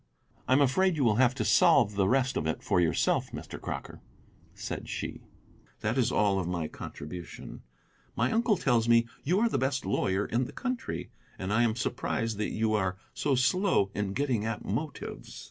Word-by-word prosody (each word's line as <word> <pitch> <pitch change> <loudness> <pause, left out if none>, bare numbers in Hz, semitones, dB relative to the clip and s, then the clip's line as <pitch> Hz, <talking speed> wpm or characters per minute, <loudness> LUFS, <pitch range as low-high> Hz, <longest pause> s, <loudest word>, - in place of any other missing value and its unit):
"I - - +3
am 140 - +5
afraid 175 +7 +3
you 145 - 0
will 110 -3 +3
have 130 0 +4
to 110 - -2
solve 105 +1 +5
the 100 -1 +2
rest 135 +1 +2
of 80 - -1
it 80 - -2
for 90 - +2
yourself, 80 -2 +1
Mr. - - -8
Crocker," - - -6 0.5
said - - -6
she; - - -5 0.6
"that 110 +2 0
is 125 -2 +2
all 100 -2 +2
of 90 - -2
my 85 -3 -2
contribution. 85 +4 -8 0.5
My 125 +3 +1
uncle 225 -3 +2
tells 120 -8 +2
me 115 0 +5 0.2
you 180 +7 +2
are 235 - +4
the 225 - 0
best 135 -1 -1
lawyer 95 0 0
in 120 +3 0
the - - -9
country, 255 -1 -4 0.3
and 95 +2 -3
I 115 - +3
am 115 -2 +2
surprised 115 -2 -2
that 105 - 0
you 110 0 0
are 95 -3 0 0.2
so 140 -2 +1
slow 130 - +2
in 100 -1 -2
getting 130 -4 0
at 110 -1 -3
motives." 145 +9 -5
115 Hz, 190 wpm, -29 LUFS, 100-135 Hz, 0.6 s, am